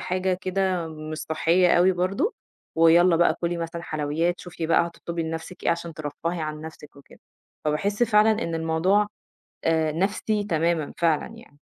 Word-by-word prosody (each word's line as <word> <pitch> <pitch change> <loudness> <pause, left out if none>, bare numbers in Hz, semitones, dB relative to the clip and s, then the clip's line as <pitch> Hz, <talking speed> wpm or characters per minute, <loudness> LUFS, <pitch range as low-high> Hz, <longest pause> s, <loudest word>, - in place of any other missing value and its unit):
حاجة 185 0 0
كده 185 -2 -1
مش 155 0 -7
صحّية 170 +3 +2
أوي 185 +2 +5
برضه 185 - -1 0.4
ويالّا 165 +1 +6
بقى 175 +1 +3
كُلي 170 0 -1
مثلًا 170 0 -5
حلويات، 155 +3 -1
شوفي 175 -2 -5
بقى 170 +1 +3
هتطلُبي 170 0 -5
لنَفْسِك 165 +3 -6
إيه - - +3
عشان 170 -1 -3
ترفَّهي 160 +3 -4
عن 155 0 -4
نَفْسِك 155 -2 -11
وكده. 140 - -17 0.4
فباحس 200 +9 0
فعلًا 215 -1 +5
إن 165 - -3
الموضوع 165 +6 +2 0.6
آآ 160 -1 +2
نَفْسي 205 +5 -1
تمامًا 165 -4 0
فعلًا 165 -3 +2
يعني. 145 0 -17
170 Hz, 155 wpm, -25 LUFS, 160-185 Hz, 0.6 s, ويالّا